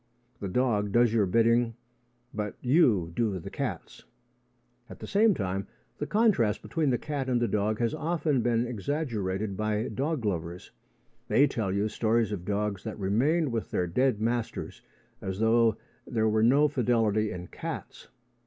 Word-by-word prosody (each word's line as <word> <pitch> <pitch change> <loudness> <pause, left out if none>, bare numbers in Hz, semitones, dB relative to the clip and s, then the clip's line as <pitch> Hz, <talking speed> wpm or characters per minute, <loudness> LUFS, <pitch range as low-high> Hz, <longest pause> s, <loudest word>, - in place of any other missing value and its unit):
The 100 - -4
dog 105 -1 0
does 120 +1 +4
your 105 -4 +3
bidding, 115 +3 +3 0.6
but 105 -1 -3
you 120 - +3
do 110 -5 0
the 80 - -8
cat's. - - -5 0.9
At - - -10
the - - -8
same 210 0 +3
time, 95 0 -3 0.3
the - - -3
contrast 205 - +2
between 160 -4 0
the 125 - +2
cat 140 -2 -4
and 125 -1 +2
the 120 - +1
dog 105 0 0
has 115 0 0
often 155 -4 0
been 120 0 +1
exaggerated 110 -5 -2
by 110 +2 -1
dog 140 -3 -2
lovers. 85 -2 -4 0.6
They 125 +4 +5
tell 110 -8 -2
you 100 +2 0
stories 110 +1 +1
of 90 -4 -4
dogs 105 -1 -2
that 110 - -5
remained 130 - +1
with 115 -2 -3
their 90 - 0
dead 125 +6 +1
masters, 115 +1 -3 0.4
as 95 0 -4
though 110 0 +3 0.3
there 110 -3 +1
were 110 0 +2
no 135 +6 +5
fidelity 115 -6 +1
in 90 0 -6
cats. - - -7
115 Hz, 160 wpm, -28 LUFS, 105-125 Hz, 0.9 s, They